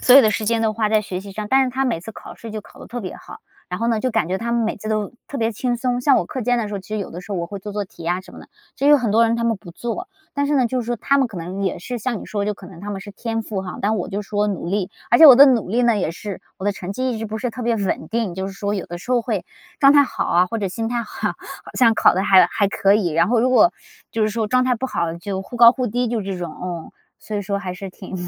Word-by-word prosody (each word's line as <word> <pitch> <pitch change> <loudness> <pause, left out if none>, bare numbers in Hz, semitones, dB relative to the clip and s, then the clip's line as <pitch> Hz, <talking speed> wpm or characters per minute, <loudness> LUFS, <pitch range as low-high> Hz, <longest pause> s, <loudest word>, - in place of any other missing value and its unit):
所 255 - +7
有 275 - +9
的 215 - +4
时 215 +1 -2
间 230 0 +1
都 220 - +2
花 215 0 0
在 215 0 +2
学 185 -3 -5
习 200 +1 -10
上， 210 +1 -5
但 270 0 +5
是 255 - -2
他 265 +2 -1
每 235 -10 -1
次 200 - -8
考 - - -11
试 230 - -9
就 215 0 -5
考 - - -18
得 - - -10
特 245 - -5
别 185 - -5
好， - - -12 0.3
然 180 - -4
后 230 - +1
呢， 225 -2 +1
就 255 - 0
感 170 - 0
觉 190 +1 -1
他 235 +2 -3
们 235 -1 +2
每 220 - -2
次 215 +1 -7
都 215 0 -1 0.2
特 280 - -5
别 230 -2 0
轻 245 +3 -1
松。 245 0 -1
像 270 +1 +4
我 - - +1
课 260 - -5
间 245 +1 +1
的 225 -3 -1
时 205 - -5
候， - - -2
其 185 - -18
实 215 - -2
有 200 - -5
的 175 - -7
时 185 - -14
候 - - -1
我 170 - -2
会 200 +3 -7
做 205 +2 -7
做 205 0 -2
题 185 - -14
呀 175 +2 -1
什 185 - -15
么 - - -11
的， - - -13 0.3
其 275 - 0
实 - - +7
有 295 - +8
很 240 -6 -1
多 230 +2 +5
人 230 +1 +1
他 235 - -1
们 230 -1 +1
不 185 -3 -12
做， 240 - -5 0.3
但 285 0 0
是 295 - +1
呢， 255 -2 +3
就 255 +2 -1
是 235 - -6
说 240 0 -1
他 280 +5 +2
们 270 - +3
可 215 - -10
能 180 +4 -5
也 190 - -1
是 245 +6 -5
像 235 0 -2
你 - - -8
说 205 -1 -2
的 - - -4
就 210 - -1
可 195 - -13
能 175 -2 -12
他 205 - -7
们 195 -1 -4
是 205 - -9
天 225 +2 -3
赋 210 -3 -4
哈， 180 - -7
但 215 +2 +1
我 - - -3
就 205 +1 -3
是 195 - -17
说 210 0 +1
努 195 -4 -3
力。 195 0 -1 0.2
而 240 - +5
且 320 - +11
我 270 - +11
的 275 - +10
努 245 -7 +2
力 235 +6 +1
呢 235 -3 +3
也 180 - -1
是 200 +2 -7 0.2
我 190 - -6
的 205 - +2
成 190 -1 -6
绩 255 +5 -1
一 230 - -3
直 225 - -4
不 215 +1 -4
是 245 +2 -2
特 245 +1 -7
别 235 0 +1
稳 190 -6 -2
定， 225 -6 -1
就 190 +1 -3
是 195 - -6
说 200 +1 -2
有 195 - -4
的 175 - -6
时 210 - -9
候 250 -1 +3
会 215 -6 -2 0.4
状 275 -1 +7
态 290 -1 +7
好 - - -3
啊， 180 +1 +3
或 225 +5 -3
者 200 -3 -1
心 225 +5 -3
态 240 0 -1
好， - - -3
好 - - -7 0.4
像 235 -3 +6
考 - - +5
的 190 - +1
还 190 -3 +6
还 200 +3 0
可 200 0 +3
以， 205 -4 +2
然 165 +2 +2
后 235 0 +3
如 255 +2 +2
果 330 +7 +5 0.4
就 225 - 0
是 215 - +3
说 220 0 -1
状 255 +3 +2
态 255 -1 +2
不 260 - -3
好， 170 -9 -1
就 190 +2 -4
忽 240 - -9
高 235 0 +8
忽 255 -1 -2
低 245 +3 -1
就 225 -2 -1
这 195 -1 -4
种， 175 -3 -5
嗯。 175 -3 -5 0.3
所 215 - -7
以 205 - 0
说 200 0 -2
还 185 -2 -5
是 195 +2 -7
挺 185 +1 -10
215 Hz, 370 characters per minute, -21 LUFS, 195-240 Hz, 0.4 s, 且